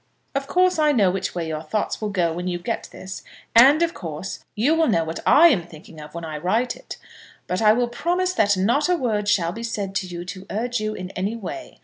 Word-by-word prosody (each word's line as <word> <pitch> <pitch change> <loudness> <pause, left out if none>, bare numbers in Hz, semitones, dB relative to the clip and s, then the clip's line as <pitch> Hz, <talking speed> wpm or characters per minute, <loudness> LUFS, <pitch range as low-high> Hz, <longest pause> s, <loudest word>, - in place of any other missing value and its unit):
Of 275 0 -2
course, 365 +1 +2
I 300 -1 +4
know 200 -8 +3
which 190 -1 -3
way 170 -2 -2
your 155 -1 -3
thoughts 205 +9 -2
will 215 - -1
go 175 -5 0
when 175 +2 -4
you 175 -1 -1
get 175 - -4
this, 190 +1 -8 0.3
and, 275 +8 +7
of 335 0 0
course, 165 +2 -6
you 245 +9 +2
will 325 -1 +3
know 165 -9 +2
what 160 +1 -5
I 340 +3 +8
am 180 - 0
thinking 155 -1 -13
of 150 +2 -12
when 170 -1 -5
I 155 -1 -5
write 225 +9 0
it; - - -10 0.5
but 180 +3 -2
I 215 -1 +6
will 240 +1 +1
promise 355 +9 -1
that 205 - +2
not 240 - +2
a 360 - +4
word 220 -9 -1
shall 175 -5 +2
be 230 - -7
said 205 -4 -3
to 185 - -3
you 175 -1 -7
to 185 +1 -8
urge 240 +3 -2
you 215 0 -2
in 185 0 -6
any 195 +5 -2
way. 230 - -8
205 Hz, 245 wpm, -23 LUFS, 180-250 Hz, 0.5 s, I